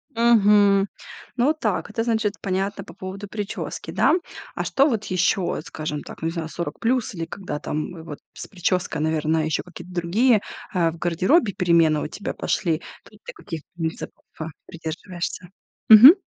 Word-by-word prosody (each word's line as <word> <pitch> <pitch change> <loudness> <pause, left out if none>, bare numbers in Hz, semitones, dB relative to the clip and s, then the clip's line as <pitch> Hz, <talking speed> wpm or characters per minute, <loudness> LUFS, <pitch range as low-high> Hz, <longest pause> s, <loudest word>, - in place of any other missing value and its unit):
Мгм. 205 -4 +5 0.5
Ну, 270 +6 +4
так, 215 -11 -2
это, 225 +2 -1
значит, 220 -3 +1
понятно, 195 +1 -2
по - - -12
поводу 190 +2 -7
прически, 205 -1 -5
да. - - +3 0.4
А - - -1
что 275 +2 +3
вот 220 -6 -1
ещё, 185 0 +1
скажем 150 -1 -5
так, - - -11
ну, 160 - 0
не - - -1
знаю, 165 -2 -4
40+, 225 - -1
или 165 - -3
когда 165 -5 -5
там, 160 +2 -4
вот, 150 -3 -8
с - - -8
прической, 175 -4 -1
наверное, 155 0 +1
ещё 155 -1 -1
какие-то 180 0 -11
другие, 205 +6 +3 0.3
а, 170 -3 +2
в 170 - -11
гардеробе 185 - +2
перемены 170 -5 +3
у - - -2
тебя 195 +6 -5
пошли, 165 -2 0 0.3
тут - - -19
ты - - -7
каких 165 - -7
принципов, 165 -2 -5 0.2
а, 155 - -3 0.2
придерживаешься? 175 +2 -6 0.4
Мгм. 245 - +12
185 Hz, 160 wpm, -23 LUFS, 165-210 Hz, 0.5 s, Мгм